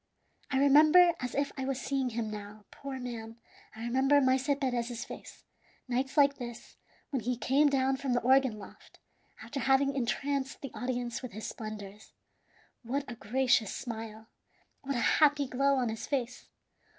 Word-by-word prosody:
I 270 Hz, -, 0 dB
remember, 310 Hz, +6 st, +6 dB
as 250 Hz, -1 st, -4 dB
if 280 Hz, 0 st, 0 dB
I 265 Hz, -, -2 dB
was 270 Hz, -1 st, -2 dB
seeing 270 Hz, -2 st, -1 dB
him 225 Hz, -2 st, -3 dB
now, 210 Hz, 0 st, -9 dB
poor 275 Hz, -1 st, -7 dB
man 230 Hz, -2 st, -7 dB, 0.4 s
I 220 Hz, -, -8 dB
remember 265 Hz, +4 st, +3 dB
Maese 260 Hz, +1 st, +2 dB
Perez's 240 Hz, -3 st, -2 dB
face, -, -, -11 dB, 0.4 s
nights 255 Hz, +3 st, -2 dB
like 280 Hz, -1 st, +5 dB
this, 240 Hz, -1 st, -8 dB, 0.4 s
when 270 Hz, -, 0 dB
he 245 Hz, +2 st, -2 dB
came 280 Hz, +4 st, +3 dB
down 265 Hz, -1 st, +1 dB
from 265 Hz, -2 st, -2 dB
the 245 Hz, -, +1 dB
organ 260 Hz, -2 st, +3 dB
loft, 205 Hz, -, -14 dB, 0.5 s
after 280 Hz, -, -5 dB
having 270 Hz, +2 st, +3 dB
entranced 275 Hz, +2 st, -2 dB
the 275 Hz, -, -6 dB
audience 245 Hz, -1 st, -3 dB
with 255 Hz, -3 st, -8 dB
his 215 Hz, +2 st, -6 dB
splendors. 210 Hz, -2 st, -8 dB, 0.7 s
What 270 Hz, +4 st, -2 dB
a -, -, -6 dB
gracious 240 Hz, -1 st, +1 dB
smile! 225 Hz, -2 st, -7 dB, 0.6 s
What 275 Hz, 0 st, -3 dB
a -, -, 0 dB, 0.2 s
happy 290 Hz, -1 st, +5 dB
glow 275 Hz, +2 st, +2 dB
on 250 Hz, -3 st, 0 dB
his 220 Hz, 0 st, -5 dB
face! 250 Hz, -3 st, -3 dB
255 Hz, 165 wpm, -30 LUFS, 235-275 Hz, 0.7 s, remember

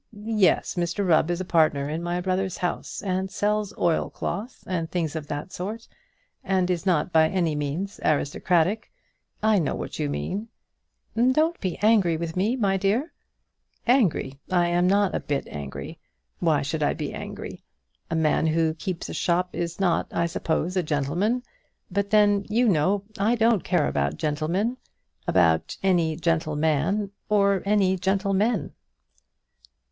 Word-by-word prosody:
"Yes; 215 Hz, -4 st, +2 dB
Mr 175 Hz, +2 st, -1 dB
Rubb 160 Hz, -1 st, +4 dB
is 175 Hz, 0 st, -1 dB
a -, -, -4 dB
partner 155 Hz, -5 st, +2 dB
in 155 Hz, +3 st, -3 dB
my 175 Hz, +1 st, -2 dB
brother's 185 Hz, 0 st, -1 dB
house, 180 Hz, +2 st, -3 dB
and 190 Hz, -1 st, -1 dB
sells 210 Hz, +1 st, 0 dB
oilcloth, 200 Hz, +6 st, -2 dB
and 170 Hz, -3 st, -2 dB
things 165 Hz, -3 st, -2 dB
of 155 Hz, -2 st, -5 dB
that 145 Hz, +5 st, -5 dB
sort, 215 Hz, +6 st, -5 dB, 0.6 s
and 185 Hz, -1 st, +1 dB
is 180 Hz, +2 st, -2 dB
not 170 Hz, -1 st, +1 dB
by 160 Hz, 0 st, +5 dB
any 170 Hz, -4 st, 0 dB
means 150 Hz, +8 st, -3 dB
aristocratic. 175 Hz, +7 st, +1 dB, 0.5 s
I 215 Hz, -2 st, +4 dB
know 155 Hz, -, -1 dB
what -, -, -6 dB
you 75 Hz, -, 0 dB
mean." 75 Hz, -, -3 dB, 0.7 s
"Don't 280 Hz, +8 st, +2 dB
be 185 Hz, -3 st, -3 dB
angry 200 Hz, -7 st, +4 dB
with 165 Hz, 0 st, -4 dB
me, 205 Hz, +7 st, +1 dB
my 200 Hz, -6 st, +1 dB
dear." 210 Hz, -, 0 dB, 0.7 s
"Angry! 190 Hz, -, +2 dB
I 175 Hz, -2 st, +2 dB
am 175 Hz, +1 st, +2 dB
not 200 Hz, 0 st, +3 dB
a -, -, 0 dB
bit 145 Hz, -1 st, -3 dB
angry. 70 Hz, -2 st, -7 dB, 0.4 s
Why 155 Hz, -5 st, +2 dB
should 155 Hz, +3 st, -3 dB
I 145 Hz, -, +1 dB
be -, -, -4 dB
angry? -, -, -7 dB, 0.5 s
A 165 Hz, -, -1 dB
man 160 Hz, 0 st, +2 dB
who 160 Hz, 0 st, +2 dB
keeps 170 Hz, +2 st, -5 dB
a -, -, -6 dB
shop 180 Hz, +1 st, +1 dB
is 170 Hz, +1 st, -3 dB
not, 180 Hz, -4 st, +1 dB
I 170 Hz, -, 0 dB
suppose, 170 Hz, +1 st, -1 dB
a 185 Hz, -, +3 dB
gentleman. 170 Hz, -, 0 dB, 0.5 s
But 200 Hz, +2 st, -1 dB
then, 205 Hz, -1 st, +4 dB
you 235 Hz, +3 st, +3 dB
know, 190 Hz, +2 st, +2 dB, 0.2 s
I 220 Hz, +4 st, +3 dB
don't 225 Hz, -3 st, +3 dB
care -, -, +1 dB
about 70 Hz, +2 st, -1 dB
gentlemen, 170 Hz, +11 st, -1 dB, 0.5 s
about 85 Hz, -3 st, +2 dB
any 170 Hz, -4 st, +2 dB
gentleman, 160 Hz, +4 st, 0 dB, 0.2 s
or 200 Hz, -2 st, +3 dB
any 195 Hz, -2 st, +3 dB
gentlemen." 195 Hz, +4 st, 0 dB
180 Hz, 150 wpm, -25 LUFS, 160-200 Hz, 0.7 s, by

